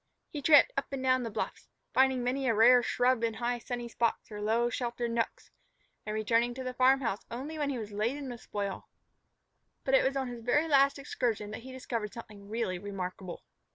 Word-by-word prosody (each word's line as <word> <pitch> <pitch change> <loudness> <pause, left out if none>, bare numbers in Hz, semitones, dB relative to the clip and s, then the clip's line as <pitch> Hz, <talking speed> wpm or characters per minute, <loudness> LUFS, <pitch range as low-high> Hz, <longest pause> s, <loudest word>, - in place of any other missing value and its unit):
He 295 - -5
tramped 310 - +6
up - - -1
and 270 -1 -4
down 255 0 +3
the 235 - -3
bluffs, 220 +1 -5 0.2
finding 265 -1 +3
many 260 +2 0
a 230 - +3
rare 245 +3 +7
shrub 245 0 +1
in 225 -1 0
high, 240 +1 -1
sunny 240 0 -5
spots 230 -1 -1
or 210 0 -6
low, 225 +3 +2
sheltered 240 -1 -2
nooks, 230 0 -2 0.6
and 215 - -2
returning 230 +3 +1
to 260 - -5
the 255 0 -4
farm 260 +2 +4
house 225 -5 -2
only 285 +7 -5
when 290 -1 0
he 270 - -2
was 215 -2 -6
laden 240 +8 -2
with 245 -2 -7
spoil. 200 -2 -4 0.9
But 270 - -1
it 270 - +6
was 270 +1 +1
on 265 -1 -1
his 240 -1 -7
very 290 +7 +2
last 280 -2 +4
excursion 235 -6 -2
that 220 - -6
he 260 +2 -10
discovered 230 -5 -4
something 210 -3 -11
really 215 -5 -2
remarkable. 185 -2 -6
240 Hz, 205 wpm, -30 LUFS, 220-260 Hz, 0.9 s, rare